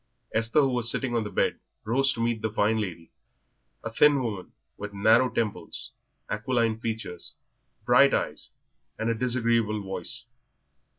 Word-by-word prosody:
Esther, 115 +6 +3
who 135 - +2
was 120 -2 +3
sitting 125 +1 -1
on 115 -2 +1
the 105 - -5
bed, - - 0 0.2
rose 135 +5 +2
to 115 - -6
meet 115 -1 0
the 110 - -1
fine 110 +1 +1
lady, 85 -5 -6 0.7
a 115 - -4
thin 145 +2 +4
woman, 105 -6 -5 0.2
with 105 0 -7
narrow 115 +5 +4
temples, 110 -4 -4 0.4
aquiline 115 0 0
features, 110 -6 -5 0.5
bright - - +6
eyes, - - -2 0.5
and 115 +1 0
a - - +2
disagreeable 115 -3 0
voice. 95 0 -6
115 Hz, 150 wpm, -27 LUFS, 105-120 Hz, 0.7 s, bright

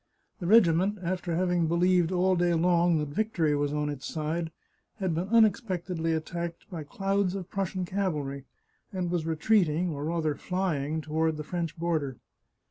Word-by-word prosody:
The 175 - -4
regiment, 195 -1 +5
after 175 -1 -2
having 175 -1 +1
believed 175 +1 +3
all 185 +1 +2
day 175 -1 +2
long 170 0 +3
that 150 -1 -2
victory 165 -4 0
was 145 0 0
on 150 0 -1
its 145 -2 -5
side, 160 +1 -2 0.5
had 190 -5 -1
been 170 +4 -2
unexpectedly 185 -7 +2
attacked 170 +1 -4
by 170 -3 -5
clouds 195 +4 -1
of 190 -2 -6
Prussian 190 -1 -2
cavalry, 150 -8 -2 0.5
and 180 -2 -2
was 170 -2 -1
retreating, 170 0 +2
or 145 -1 -4
rather 160 -2 0
flying, 160 -4 -2
to 150 - -12
ward 160 0 +1
the 150 - -4
French 170 0 -4
border. 160 -6 -1
170 Hz, 160 wpm, -28 LUFS, 155-185 Hz, 0.5 s, regiment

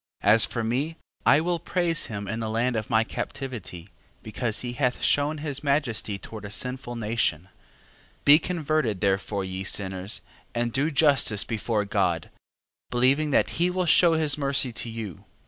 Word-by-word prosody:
13:7. - - +5
As 115 - +8
for 115 - -3
me, 135 +8 -1 0.3
I 140 - +6
will 175 +1 -1
praise 175 -3 0
him 100 -3 -5
in 110 +3 -3
the 110 -1 -3
land 120 +3 0
of 110 -1 -3
my 110 -1 +3
captivity: 115 -8 -6 0.3
because 110 0 -2
he 120 -1 -4
hath 125 0 -1
shewn 145 +2 +2
his 145 -1 -4
majesty 140 -8 0
toward 110 +1 -9
a 100 - -6
sinful 125 +3 -3
nation, 105 -6 -1 0.7
13:8. - - -35
Be 145 +2 +8
converted 155 - -1
therefore, 100 0 0
ye 95 0 -5
sinners, 95 +1 -2 0.3
and 120 -1 -1
do 140 +4 +2
justice 140 -8 +3
before 110 -1 -1
God, 90 -5 0 0.6
believing 135 +5 +2
that 145 - +2
he 175 - +4
will 180 0 -1
shew 170 +1 +5
his 155 -2 +1
mercy 140 -3 +1
to 115 - -6
you. 110 -7 -7
120 Hz, 170 wpm, -26 LUFS, 105-145 Hz, 0.7 s, As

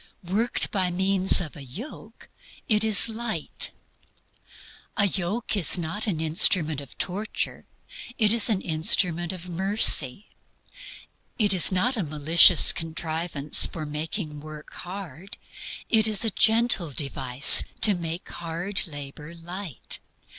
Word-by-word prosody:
Worked 215 +7 0
by 185 -3 -1
means 190 +1 +3
of 165 -5 -6
a 145 - -10
yoke, 195 - -12 0.4
it 215 -1 +2
is 220 -1 +6
light. 230 0 -4 1.3
A 200 - +3
yoke 200 +4 -3
is 190 -2 +3
not 180 +6 -3
an 175 -7 -3
instrument 160 -1 +1
of 140 - -15
torture; 205 +4 -5 0.5
it 215 -1 +3
is 230 0 +1
AN 200 -4 0
INSTRUMENT 170 +1 0
OF 180 -1 -10
MERCY. 190 - +1 1.1
It 205 -4 +2
is 185 0 +4
not 230 +8 0
a 205 - -2
malicious 155 +3 +5
contrivance 160 -2 -2
for 160 -2 -8
making 150 +1 -5
work 150 0 -12
hard; 185 -1 -10 0.5
it 220 -1 +4
is 215 +1 -1
a 225 - 0
gentle 220 -5 +1
device 135 -2 +5 0.2
to 210 - +6
make 170 -1 -6
hard 175 +4 -3
labor 150 +2 -10
light. 175 - -6
175 Hz, 125 wpm, -24 LUFS, 155-205 Hz, 1.3 s, is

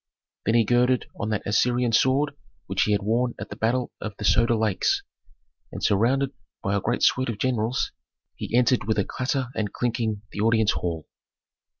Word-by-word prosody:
Then 115 - +3
he 115 -2 +4
girded 125 +1 +2
on 105 - -2
that 110 -2 -2
Assyrian 120 +3 +2
sword 135 +5 +3 0.3
which 95 +1 +1
he 105 - 0
had 100 -1 +1
worn 120 +4 0
at - - -6
the - - -5
battle 120 +2 0
of 105 -2 -6
the 105 - -4
Soda 115 +3 +4
Lakes, 110 -3 +1 0.7
and, - - -7
surrounded 130 +7 +2 0.3
by 100 - 0
a 100 - +1
great 120 +5 -1
suite 130 -1 +3
of 115 - -3
generals, 120 0 0 0.4
he - - -6
entered 125 -3 +3
with 110 - +1
a 100 - +2
clatter 130 -1 -2
and 105 -2 -2
clinking 115 -4 -1
the - - -7
audience 110 -1 +3
hall. 80 -3 -3
115 Hz, 185 wpm, -25 LUFS, 105-125 Hz, 0.7 s, he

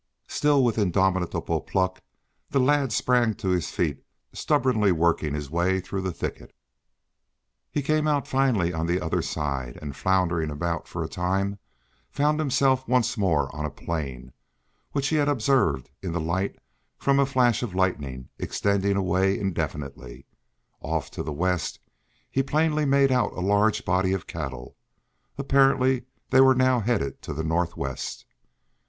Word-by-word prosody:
Still, 145 -2 +2
with 115 -2 +1
indomitable 95 -2 +1
pluck, 95 -1 -1 0.5
the 140 - +1
lad 140 0 +2
sprang 120 -2 +2
to 95 - -3
his 90 -2 0
feet, - - -2 0.3
stubbornly 110 -6 +2
working 80 -3 +1
his 75 -2 -5
way 90 +3 +1
through 95 +1 -4
the 95 -1 -2
thicket. - - -6 1.1
He 145 - -2
came 155 +2 +1
out 145 -2 +1
finally 120 -10 +1
on 80 +1 -2
the 90 +2 +1
other 80 -3 -1
side 65 -5 -3
and 70 -3 -7
floundering 85 -3 +1
about 85 +2 -3
for - - -4
a - - -3
time, 95 +3 -1 0.5
found 150 +2 +1
himself 135 -2 +2
once 120 -1 +2
more 90 -9 0
on 75 - -4
a 75 - -1
plain, 70 -7 -5 0.6
which 140 -1 0
he 155 - +1
had 145 -1 +2
observed 110 - +1
in 90 -4 -4
the 85 - -1
light 90 +5 -2 0.4
from 140 0 +2
a 140 - +5
flash 125 -4 +2
of 110 -7 -4
lightning 70 -9 -1
extended 100 -1 0
away 95 +1 +2
indefinitely. 75 -8 -4 0.5
Off - - -3
to - - -5
the 75 - -4
west, 90 +3 -1 0.5
he 135 - +2
plainly 155 +2 +1
made 140 -1 +4
out 125 -1 +1
a - - -7
large 105 +3 +2
body 95 +1 +2
of 95 - -3
cattle. 65 -7 -6 0.6
Apparently 135 -2 +3 0.3
they 130 0 +7
were 130 0 +6
now 130 -1 +3
headed 110 - -1
to - - -6
the 80 - -2
northwest. 85 +2 -2
95 Hz, 155 wpm, -25 LUFS, 85-130 Hz, 1.1 s, they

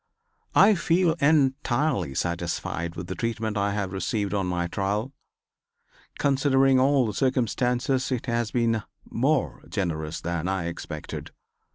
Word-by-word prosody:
I 210 +2 +7
feel 170 -1 +2
entirely 135 - +2
satisfied 85 0 -2
with 85 - -5
the 90 - -4
treatment 110 0 -2
I 100 0 0
have 100 -2 -2
received 100 +2 -1
on 100 -2 0
my 90 -1 -1
trial. 100 +8 -2 1.0
Considering 135 -1 +3
all 135 0 +4
the 105 - -2
circumstances 125 +2 0
it 125 -3 -1
has 115 -2 0
been 115 -2 +1 0.2
more 135 +4 0
generous 80 -5 -2
than 85 0 -3
I 95 -2 -1
expected. 85 -2 -6
115 Hz, 130 wpm, -26 LUFS, 90-135 Hz, 1.0 s, I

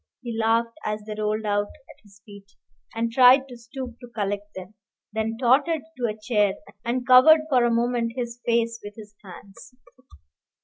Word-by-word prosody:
He 235 -2 -5
laughed 230 +1 0
as 210 0 -3
they 215 - -6
rolled 215 +1 -2
out 205 0 0
at - - -19
his 205 -1 -22
feet, 200 -1 -15 0.4
and 230 0 -1
tried 260 +2 +6
to 250 - -11
stoop 240 +1 -9
to 245 - -11
collect 205 -2 -4
them, 185 +2 -9 0.4
then 220 +1 -2
tottered 280 +5 +2
to 245 -2 -1
a 215 -1 -5
chair, 210 -3 +1 0.3
and 245 +1 -2
covered 260 +5 +7
for 255 -4 +3
a 240 - +1
moment 235 0 0
his 240 -1 -5
face 230 -1 0
with 205 0 -9
his 210 -2 -13
hands. 195 +5 -14
230 Hz, 175 wpm, -24 LUFS, 210-245 Hz, 0.4 s, covered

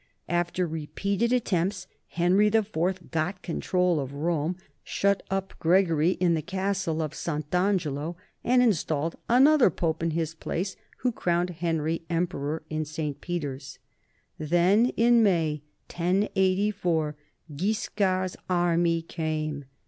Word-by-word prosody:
After 175 +1 0
repeated 200 +8 -2
attempts 190 -5 0 0.2
Henry 180 +4 +3
IV 190 -4 0
got 175 +3 -2
control 180 0 +1
of 140 0 -5
Rome, 165 +2 -1 0.3
shut 200 0 +1
up 195 0 -2
Gregory 170 -1 +3
in 180 -2 +1
the 160 - 0
Castle 190 -3 -1
of 155 -1 -4
Sant' 150 -2 -4
Angelo, 175 -4 0 0.3
and 250 +1 +4
in 230 -4 +5
stalled 155 -1 -2
another 270 +1 +6
Pope 165 -1 -2
in 165 - +1
his 165 0 -2
place, 180 +3 -3 0.3
who 250 - +2
crowned 175 -4 0
Henry 165 -1 -1
emperor 165 -3 -2
in 155 0 -2
St. 150 -1 -4
Peter's. 145 -6 -5 0.6
Then, 175 +9 +3
in 235 0 +5
May, 165 -8 +2 0.3
1084, 185 -3 +1 0.4
Guiscard's 185 0 0
army 170 -2 +2
came. 155 -3 -3
175 Hz, 120 wpm, -27 LUFS, 160-195 Hz, 0.6 s, another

